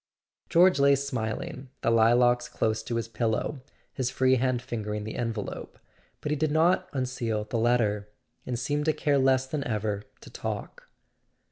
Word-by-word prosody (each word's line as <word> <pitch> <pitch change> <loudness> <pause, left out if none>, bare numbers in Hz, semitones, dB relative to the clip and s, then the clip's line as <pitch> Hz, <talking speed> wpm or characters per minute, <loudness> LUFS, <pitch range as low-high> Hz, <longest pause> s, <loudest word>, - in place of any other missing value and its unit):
George 180 -1 +5
lay 140 0 +6
smiling, 130 -1 -4
the 115 - +2
lilacs 120 +2 +4
close 110 0 0
to 120 - -4
his 115 0 -2
pillow, 115 +5 -1 0.3
his 130 -2 -1
free 130 0 +3
hand 130 0 +1
fingering 105 -3 -4
the 110 - -5
envelope; 115 -4 -4 0.4
but 150 - -3
he - - +2
did 155 +1 0
not 165 +5 +2
unseal 125 -5 -2
the 115 +2 -3
letter, 110 -3 +1 0.3
and 125 -1 -3
seemed 145 +4 -1
to 155 - +3
care 145 -2 +1
less 130 0 +3
than 140 +1 -3
ever 105 -3 -2 0.2
to - - -13
talk. - - -6
125 Hz, 160 wpm, -27 LUFS, 110-140 Hz, 0.4 s, lay